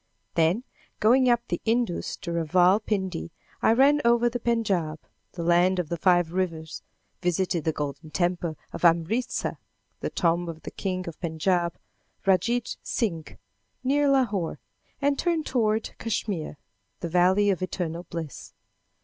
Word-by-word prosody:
Then, 170 +7 +2 0.4
going 250 +4 +5
up 240 0 +2
the - - -2
Indus 230 -5 0
to 170 - -4
Raval 180 +5 +3
Pindi, 190 -6 -2 0.3
I - - +4
ran 280 +5 +5
over 235 0 +4
the 245 +1 -3
Pendjab 200 -10 0 0.4
the 170 - -5
land 175 +2 +4
of 175 -4 -2
the 170 - -1
five 175 -1 +3
rivers; 165 -3 -3 0.4
visited 175 -2 0
the 160 - +2
Golden 150 +1 -5
Temple 175 -2 -1 0.2
of - - -6
Amritsa 170 +9 +1 0.4
the - - -2
tomb 170 0 +1
of 160 -1 -8
the - - -6
King 185 -2 -3
of 165 - -7
Pendjab, 170 +1 0 0.5
Randjid 230 +6 +1
Singh, 165 -9 -3 0.5
near 285 +2 +3
Lahore; 220 -11 +1 0.4
and 280 -1 +1
turned 335 -3 0
toward 220 -3 0
Kachmyr, 205 -8 -2 0.5
"The 170 - -3
Valley 185 +4 +4
of 185 - -2
Eternal 175 -2 -3
Bliss." 165 -5 -7
185 Hz, 140 wpm, -26 LUFS, 170-230 Hz, 0.5 s, going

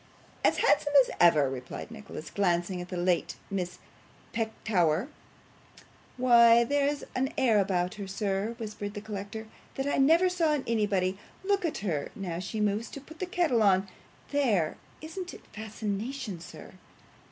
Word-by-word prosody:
'As - - +4
handsome 290 - +3
as - - -2
ever,' 155 -5 +6
replied 130 - -6
Nicholas, 210 -7 -9
glancing 180 -1 0
at 175 - -8
the 180 - -4
late 175 0 +1 0.2
Miss 180 -2 -3 0.6
Petowker. 215 - 0 1.1
'Why, 235 -2 +7
there's 285 +3 0 0.3
air 235 -5 +4
about 185 -2 0
her, 195 - -5
sir,' 200 +3 -2
whispered 210 -2 -6
the 205 - -5
collector, 210 +1 -6 0.3
'that 270 - -2
I 285 - 0
never 325 +7 +5
saw 340 -4 +2
in 290 -3 -1
anybody. 200 -4 0 0.2
Look 395 -1 +1
at 325 - -1
her 155 -7 -1
now 180 -5 -4
she 195 +4 -4
moves 210 +2 0
to - - -8
put 315 +4 -14
the 370 - -2
kettle 335 -10 +2
on. 195 -2 +4 0.4
There! 225 - +1 0.2
Isn't 355 +3 -6
it - - -15
fascination, 215 0 -4
sir? 165 - -11
215 Hz, 150 wpm, -29 LUFS, 185-265 Hz, 1.1 s, Why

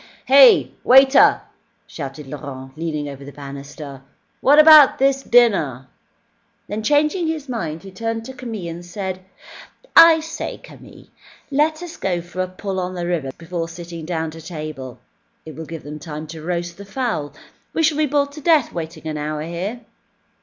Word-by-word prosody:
"Heh! 270 -1 +7
Waiter!" 265 +2 +6 0.4
shouted 140 0 -8
Laurent, 130 -1 -9
leaning 155 -2 -3
over 140 -1 -9
the 140 - -10
banister, 140 0 -9 0.4
"what 285 +2 +4
about 305 -2 +8
this 270 0 +2
dinner?" 195 - +2 0.8
Then, 210 +1 -4
changing 300 - +1
his 315 -3 -3
mind, 165 -10 -4
he 195 - -10
turned 225 +3 -4
to 265 - -8
Camille 220 -10 -6
and 170 +1 -10
said: 185 +1 -6 0.7
"I 330 -1 +9
say, 325 +1 -6
Camille, - - -15 0.5
let 310 +4 +1
us 345 -2 -9
go 180 -2 -1
for 175 +2 -6
a 185 - -1
pull 190 +1 -5
on 185 0 -4
the 175 -1 -3
river 170 -6 -2
before 165 0 -5
sitting 170 -1 -9
down 160 -1 -3
to 165 +1 -11
table. 155 -6 -7 0.5
It 155 - -9
will 160 0 -8
give 165 -2 -8
them 150 +1 -8
time 155 -1 -7
to 160 - -9
roast 175 +1 -4
the - - -7
fowl. 200 - -3 0.4
We 325 - 0
shall 305 -1 +2
be 305 - +2
bored 285 0 0
to 300 +1 -10
death 310 -4 +3
waiting 160 -1 -7
an 155 -1 -3
hour 150 0 -4
here." 180 +9 -5
175 Hz, 170 wpm, -20 LUFS, -, 0.8 s, I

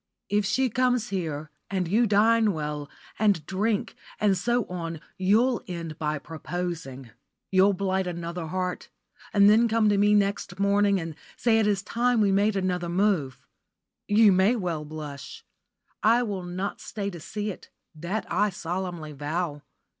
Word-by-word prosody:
"If 205 0 +1
she 260 +6 +2
comes 250 0 +1
here, 155 -6 -3 0.2
and 190 -3 -1
you 225 +7 +3
dine 215 +1 +4
well, 150 -2 -4 0.3
and 200 -8 +2
drink, 205 +3 -1 0.3
and 205 -2 +3
so 235 +5 0
on, 165 -3 -5 0.2
you'll 225 +7 +3
end 170 -4 -6
by 150 -1 -1
proposing. 160 -5 -6 0.4
You'll 190 +1 +5
blight 190 0 -1
another 170 -1 -4
heart, 180 +2 -3 0.4
and 200 -1 +5
then 220 +3 +6
come 225 -1 +3
to 205 -1 +2
me 205 +1 +4
next 200 -2 0
morning, 200 0 +3
and 165 -1 -5 0.2
say 225 -2 +3
it 215 - +2
is 200 -2 +1
time 240 +3 +1
we 205 -2 +3
made 200 +2 +2
another 180 -2 -1
move. 175 - 0 0.6
You 210 0 +6
may 190 +6 +4
well 170 -8 -3
blush. 150 -3 -8 0.6
I 235 +3 +4
will 200 -5 -4
not 185 +3 -4
stay 200 -2 -4
to 175 - -8
see 210 +6 -4
it, - - -12 0.2
that 170 +7 -4
I 210 +1 +1
solemnly 175 -3 -4
vow. 150 +1 -3
190 Hz, 155 wpm, -26 LUFS, 170-210 Hz, 0.6 s, then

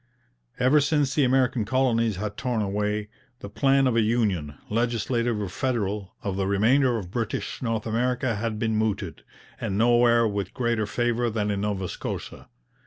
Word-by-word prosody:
Ever 130 +4 +4
since 145 -2 +1
the 145 - +2
American 130 -2 +2
colonies 115 -2 +1
had 100 +2 -4
torn 120 -4 -1
away, 105 +1 -2 0.3
the 100 - -8
plan 135 +3 +3
of 125 -3 +2
a 115 - +4
union, 105 -10 0
legislative 115 0 0
or 100 - -2
federal, 105 -2 -2
of 95 -1 -2
the 95 -1 0
remainder 120 +6 +3
of 90 -5 -7
British 115 0 -3
North 115 -3 -2
America 120 +2 0
had 110 0 -2
been 110 0 0
mooted, 110 -1 -2 0.4
and 95 - -2
nowhere 120 0 +4
with 100 -3 -4
greater 120 -4 0
favour 120 +2 0
than 105 -2 -1
in 100 -1 -2
Nova 100 -3 -2
Scotia. - - -6
115 Hz, 165 wpm, -25 LUFS, 105-120 Hz, 0.4 s, Ever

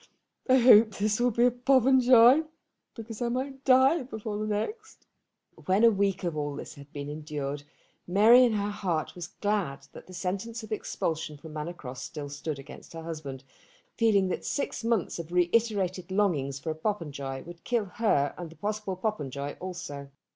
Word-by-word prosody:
I 260 - +7
hope 225 -4 +7
this 210 +2 0
will 245 +1 +3
be 235 +1 +2
a 250 - +4
Popenjoy, 255 +1 +5 0.5
because 225 -1 -8
I 240 - 0
might 265 +2 -4
die 265 +5 +5
before 220 -4 -5
the 215 - -2
next." 425 - -4 0.6
When 190 +4 +2
a 230 - +8
week 195 -2 0
of 170 -3 -2
all 145 -1 -3
this - - -8
had 140 -1 -14
been 145 -1 -6
endured 145 -1 -5 0.5
Mary 220 +7 +7
in 240 -3 +3
her 205 0 -1
heart 180 -7 -2
was 175 -2 -7
glad 180 -10 -2
that - - -12
the 185 - -12
sentence 200 +6 -4
of 220 - -11
expulsion 160 -7 -3
from 155 +1 -11
Manor 155 +3 -4
Cross 130 -6 -8
still 145 -2 -6
stood 145 +1 -5
against 135 - -12
her 165 0 -7
husband, 150 -5 -7 0.5
feeling 205 -5 +3
that - - -3
six 280 - -3
months 230 -7 0
of 170 0 -7
reiterated 185 0 +1
longings 170 -9 0
for 150 +3 -4
a - - -5
Popenjoy 145 -8 -4
would 170 0 -12
kill 235 -4 0
her 180 -8 +1
and 175 -2 -6
the 165 - -14
possible 210 -1 -3
Popenjoy 145 - -3
also. 145 -6 -7
190 Hz, 175 wpm, -28 LUFS, 155-230 Hz, 0.6 s, a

